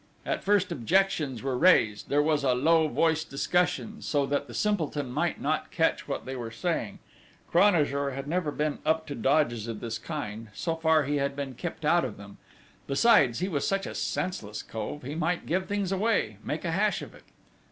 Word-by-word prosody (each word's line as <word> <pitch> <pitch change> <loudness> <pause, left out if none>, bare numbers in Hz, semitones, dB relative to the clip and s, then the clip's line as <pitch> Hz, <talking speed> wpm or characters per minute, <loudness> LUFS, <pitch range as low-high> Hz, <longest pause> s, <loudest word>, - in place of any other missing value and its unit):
At - - -2
first 200 -2 +2
objections 155 -3 +1
were 135 -2 -1
raised; 120 - +4
there 145 +1 +3
was 150 -2 +1
a 130 -2 +3
low 160 +4 +4
voiced 160 0 +1
discussion, 180 +9 0
so 145 -2 0
that 145 +1 -1
the 120 - -10
simpleton 155 - -1
might - - -1
not - - -1
catch - - 0
what - - -4
they 130 - -5
were 120 -3 -5
saying: 115 0 -2 0.5
Cranajour 150 -7 +3
had 135 +1 -5
never 170 0 0
been 150 0 -2
up 160 +1 +1
to 145 - -5
dodges 120 -4 +1
of 115 -2 -5
this 115 -1 -4
kind: 115 -8 -5
so 165 +10 -2
far 160 -1 +3
he 145 +2 -1
had 140 0 -1
been 140 -2 -4
kept 160 +3 -6
out 170 +3 +4
of 120 -5 -4
them; 100 0 -12 0.5
besides, 140 - +4
he 185 - +1
was 150 -7 -1
such 195 0 0
a - - -5
senseless 110 - -3
cove, 115 +6 -6
he 135 +4 -5
might 165 +2 -1
give 185 +3 -1
things 200 -2 -1
away, 195 - +1
make 155 +5 -4
a 165 - 0
hash 205 +4 +1
of - - -10
it! - - -15
150 Hz, 195 wpm, -28 LUFS, 130-175 Hz, 0.5 s, raised